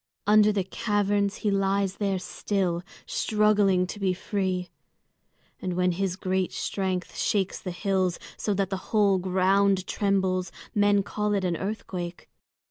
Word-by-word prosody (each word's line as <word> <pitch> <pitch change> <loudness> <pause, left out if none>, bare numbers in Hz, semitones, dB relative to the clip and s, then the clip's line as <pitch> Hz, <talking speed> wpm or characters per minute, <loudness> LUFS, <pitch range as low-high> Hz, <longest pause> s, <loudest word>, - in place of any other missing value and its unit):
Under 210 0 +6
the 200 -2 0
caverns 205 0 0
he 205 - +3
lies 195 0 +1
there 200 -2 0
still, 185 -2 -1 0.2
struggling 210 -4 +2
to 195 +3 -7
be 190 -2 +1
free. 185 -2 -2 0.9
And 185 - -2
when 180 0 +2
his 185 +1 -1
great 185 0 -1
strength 185 -2 -2
shakes 195 -3 0
the 185 - -5
hills 185 -1 0 0.2
so 205 - -1
that 195 0 -1
the 190 - 0
whole 205 -4 +3
ground 190 +1 +2
trembles, 190 -2 0 0.2
men 205 -2 +3
call 210 +1 -1
it 195 -2 0
an 175 -2 0
earthquake. 180 -2 -5
195 Hz, 140 wpm, -26 LUFS, 185-205 Hz, 0.9 s, Under